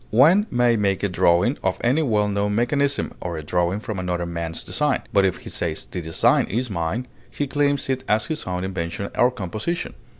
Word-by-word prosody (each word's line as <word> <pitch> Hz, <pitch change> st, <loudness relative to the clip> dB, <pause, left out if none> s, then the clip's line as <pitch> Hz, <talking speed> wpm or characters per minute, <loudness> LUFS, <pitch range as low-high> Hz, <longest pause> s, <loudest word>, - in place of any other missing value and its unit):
One 165 Hz, -, +5 dB
may 120 Hz, -1 st, +3 dB
make 100 Hz, -2 st, 0 dB
a -, -, +3 dB
drawing 90 Hz, +8 st, +2 dB
of 95 Hz, -1 st, 0 dB
any 130 Hz, +7 st, +3 dB
well 105 Hz, -8 st, +2 dB
known 105 Hz, 0 st, 0 dB
mechanism, 140 Hz, +4 st, +1 dB
or 85 Hz, -2 st, -4 dB
a 80 Hz, -, -6 dB
drawing 90 Hz, +5 st, 0 dB
from 110 Hz, -3 st, -5 dB
another 90 Hz, -1 st, -2 dB
man's 85 Hz, -1 st, -4 dB
design; 150 Hz, -2 st, 0 dB
but 100 Hz, -2 st, +5 dB
if 95 Hz, -, 0 dB
he -, -, -10 dB
says, 80 Hz, -2 st, -3 dB
"The 90 Hz, -, -5 dB
design 80 Hz, 0 st, +2 dB
is 120 Hz, +2 st, -2 dB
mine," 90 Hz, +7 st, -2 dB, 0.2 s
he 145 Hz, -, -2 dB
claims 145 Hz, 0 st, +1 dB
it 130 Hz, -1 st, -1 dB
as 105 Hz, +1 st, +2 dB
his 155 Hz, -1 st, -3 dB
own 90 Hz, 0 st, -3 dB
invention 95 Hz, +1 st, -4 dB
or 120 Hz, -, +4 dB
composition. 110 Hz, -, -4 dB
105 Hz, 200 wpm, -23 LUFS, 90-130 Hz, 0.2 s, One